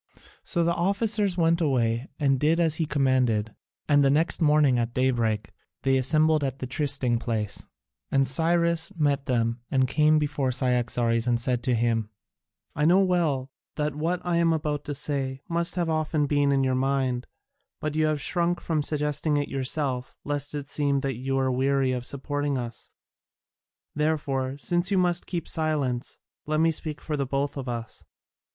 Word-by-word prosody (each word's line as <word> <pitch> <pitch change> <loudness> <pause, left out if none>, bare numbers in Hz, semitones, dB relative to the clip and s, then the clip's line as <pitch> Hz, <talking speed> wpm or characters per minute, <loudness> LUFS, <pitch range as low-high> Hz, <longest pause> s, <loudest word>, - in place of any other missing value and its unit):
So 170 - -1
the 170 +1 +2
officers 200 +2 +1
went 165 0 +2
away 120 -4 0
and 135 -3 +2
did 155 +4 +2
as 160 -2 +2
he 160 - -1
commanded, 125 -7 +1 0.3
and 145 -1 +4
the 135 - +4
next 155 +5 +2
morning 150 -5 +4
at 115 0 -2
daybreak 115 -6 0 0.3
they 135 0 +3
assembled 155 +3 +3
at 135 -1 -2
the 130 - -5
trysting 130 -3 0
place, 110 -4 -3 0.4
and 135 -1 +2
Cyrus 170 +4 +2
met 145 -4 0
them 115 -2 0
and 130 -1 +2
came 155 +3 +3
before 145 -3 0
Cyaxares 120 -2 0
and 120 -1 +2
said 125 0 0
to 125 0 +1
him: 115 -2 0 0.7
"I 150 - 0
know 180 +4 +5
well 160 -8 0 0.2
that 150 -1 -1
what 165 +5 -1
I 175 -1 +1
am 170 -1 +3
about 150 -2 -2
to 145 - -4
say 135 -2 -3
must 170 0 -1
often 155 -3 0
have 145 - +1
been 145 -1 +2
in 135 -1 +2
your 130 -1 +1
own 130 - 0
mind, 130 -2 0 0.5
but 155 -1 -3
you 155 0 +2
have 155 -1 0
shrunk 175 +3 0
from 160 -2 -1
suggesting 150 0 0
it 145 - -1
yourself 135 -1 -3
lest 145 0 -3
it 145 -1 -4
seem 140 -1 0
that 135 -4 -2
you 135 +2 -2
were 130 -1 +1
weary 135 +1 +1
of 125 -1 -3
supporting 145 0 -2
us. 120 -2 -7 1.0
Therefore 140 -3 -1
since 175 +7 0
you 200 - +1
must 175 -1 +1
keep 170 -3 -4
silence, 145 -6 -1 0.3
let 155 0 +1
me 165 +1 +4
speak 155 -1 -4
for 155 - -3
both 140 +1 -2
of 135 -3 -5
us. 115 -2 -6
140 Hz, 175 wpm, -26 LUFS, 130-155 Hz, 1.0 s, know